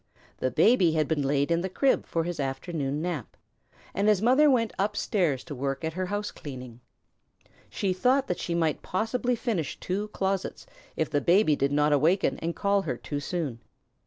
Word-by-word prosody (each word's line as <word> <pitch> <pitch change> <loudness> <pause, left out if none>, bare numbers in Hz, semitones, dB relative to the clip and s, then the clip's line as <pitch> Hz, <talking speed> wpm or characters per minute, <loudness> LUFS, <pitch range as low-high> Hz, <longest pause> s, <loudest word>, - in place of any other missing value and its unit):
The 130 - 0
Baby 185 - +4
had 155 -2 +1
been 160 -2 0
laid 140 +2 +1
in 170 0 +2
the 190 - -3
crib 270 +8 +1
for 165 - -1
his 175 -1 -4
afternoon 140 +2 -2
nap, 170 -9 -4 0.6
and 200 +1 0
his 210 -3 +4
mother 260 +8 +5
went 230 -5 +2
up 205 +1 0
stairs 170 - 0
to 160 - -8
work 135 +2 -3
at 160 - -2
her 185 +2 -2
house 205 +2 -3
cleaning. 125 -4 -9 0.9
She 190 -2 -1
thought 255 +8 +2
that 180 - -3
she 170 - -2
might 160 -3 0
possibly 240 +5 -1
finish 210 - -2
two 200 +3 -2
closets 195 -2 -2 0.3
if 160 - -1
the 145 -1 +1
baby 175 -2 +4
did 140 0 0
not 150 +1 +3
awaken 165 +7 +2
and 165 +1 -3
call 200 0 +2
her 130 -10 -3
too 145 +3 -4
soon. 145 -6 -3
170 Hz, 190 wpm, -27 LUFS, 145-200 Hz, 0.9 s, mother